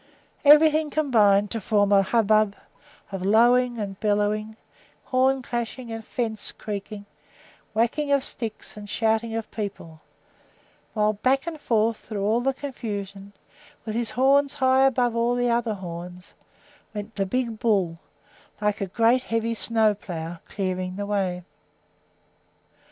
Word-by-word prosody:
Everything 305 Hz, +1 st, +6 dB
combined 210 Hz, -10 st, +3 dB
to 225 Hz, -, -3 dB
form 205 Hz, 0 st, +2 dB
a 200 Hz, -1 st, +6 dB
hubbub 215 Hz, 0 st, +2 dB, 0.6 s
of 195 Hz, -2 st, -4 dB
lowing 240 Hz, +4 st, +4 dB
and 200 Hz, -3 st, -5 dB
bellowing, 210 Hz, +1 st, 0 dB, 0.5 s
horn 260 Hz, 0 st, +1 dB
clashing 240 Hz, 0 st, -4 dB
and 225 Hz, 0 st, -5 dB
fence 220 Hz, -2 st, -2 dB
creaking, 205 Hz, 0 st, -7 dB, 0.7 s
whacking 245 Hz, +6 st, +1 dB
of 280 Hz, -1 st, +3 dB
sticks 225 Hz, -5 st, -7 dB
and 205 Hz, -1 st, -10 dB
shouting 225 Hz, +1 st, 0 dB
of 225 Hz, -1 st, -4 dB
people; 180 Hz, -7 st, -6 dB, 0.9 s
while 210 Hz, 0 st, +2 dB
back 260 Hz, +6 st, +1 dB
and 320 Hz, -3 st, -6 dB
forth 225 Hz, -2 st, +1 dB
through 205 Hz, -3 st, -5 dB
all 220 Hz, +4 st, +2 dB
the 270 Hz, +2 st, +1 dB
confusion, 200 Hz, -8 st, -6 dB, 0.5 s
with 215 Hz, -, -4 dB
his 230 Hz, 0 st, -1 dB
horns 275 Hz, +3 st, +3 dB
high 265 Hz, -1 st, +4 dB
above 245 Hz, -2 st, +1 dB
all 235 Hz, +1 st, +1 dB
the 245 Hz, -1 st, +1 dB
other 235 Hz, -2 st, 0 dB
horns, 180 Hz, 0 st, -8 dB, 0.6 s
went 210 Hz, +1 st, -6 dB
the 195 Hz, -1 st, -1 dB
big 235 Hz, 0 st, -2 dB
bull, 190 Hz, -7 st, +1 dB, 0.6 s
like 210 Hz, -1 st, -1 dB
a 195 Hz, -, -1 dB
great 230 Hz, +6 st, +3 dB
heavy 230 Hz, -1 st, -1 dB
snowplow, 205 Hz, -8 st, -1 dB
clearing 185 Hz, -1 st, -3 dB
the 205 Hz, +1 st, -4 dB
way. 190 Hz, -3 st, -1 dB
220 Hz, 135 wpm, -25 LUFS, 200-245 Hz, 0.9 s, Everything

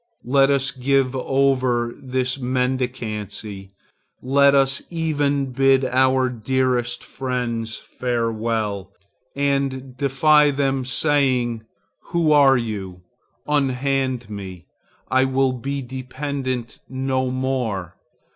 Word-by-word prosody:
Let 135 Hz, +2 st, +4 dB
us 140 Hz, -1 st, +2 dB
give 135 Hz, 0 st, +1 dB
over 130 Hz, -3 st, +1 dB
this 130 Hz, -1 st, -2 dB
mendicancy. 125 Hz, -6 st, -3 dB, 0.5 s
Let 140 Hz, +2 st, +4 dB
us 135 Hz, 0 st, +2 dB
even 145 Hz, -5 st, 0 dB
bid 135 Hz, +1 st, +3 dB
our 130 Hz, 0 st, +3 dB
dearest 125 Hz, 0 st, -1 dB
friends 120 Hz, -4 st, -3 dB
farewell, 115 Hz, -4 st, -2 dB, 0.4 s
and 140 Hz, -2 st, -1 dB
defy 145 Hz, +2 st, +4 dB
them, 135 Hz, -2 st, 0 dB
saying, 125 Hz, -4 st, +1 dB, 0.4 s
'Who 170 Hz, -3 st, +1 dB
are 140 Hz, -3 st, +6 dB
you? 100 Hz, -6 st, -5 dB, 0.4 s
Unhand 135 Hz, -3 st, 0 dB
me: 95 Hz, -4 st, -8 dB, 0.5 s
I 130 Hz, 0 st, +4 dB
will 130 Hz, 0 st, +1 dB
be 135 Hz, +2 st, -4 dB
dependent 130 Hz, -1 st, -4 dB
no 130 Hz, 0 st, -1 dB
more. 125 Hz, -9 st, -2 dB
130 Hz, 95 wpm, -22 LUFS, 120-135 Hz, 0.5 s, are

